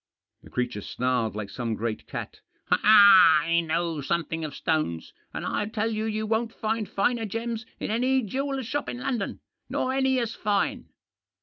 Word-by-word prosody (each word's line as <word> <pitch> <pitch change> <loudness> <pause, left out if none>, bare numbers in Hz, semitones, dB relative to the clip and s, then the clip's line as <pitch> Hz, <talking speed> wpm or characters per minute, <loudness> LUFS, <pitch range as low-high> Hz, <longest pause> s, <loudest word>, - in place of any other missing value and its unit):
The - - -15
creature 125 -4 -2
snarled 125 -1 -1
like 105 -2 -5
some 115 -3 -3
great 110 0 -4
cat. - - -6
" - - -34
I 180 -6 +7
know 165 -1 -1
some 170 +5 0
thing 165 +2 -4
of 150 -3 -5
stones, 155 - -2 0.2
and - - -5
I 205 - -1
tell 220 +1 -1
you 215 0 -2
you 215 0 -2
won't 225 +1 -1
find 220 -1 -2
finer 225 +3 0
gems 230 +2 -4
in - - -3
any 255 +3 +2
jeweller's 270 +4 -3
shop 290 +5 -3
in - - -5
London 245 -5 -3
— - - -53
nor 260 - -1
any 265 -1 +2
as 235 -3 -1
fine." 205 -2 -1
210 Hz, 180 wpm, -26 LUFS, 155-230 Hz, 0.2 s, I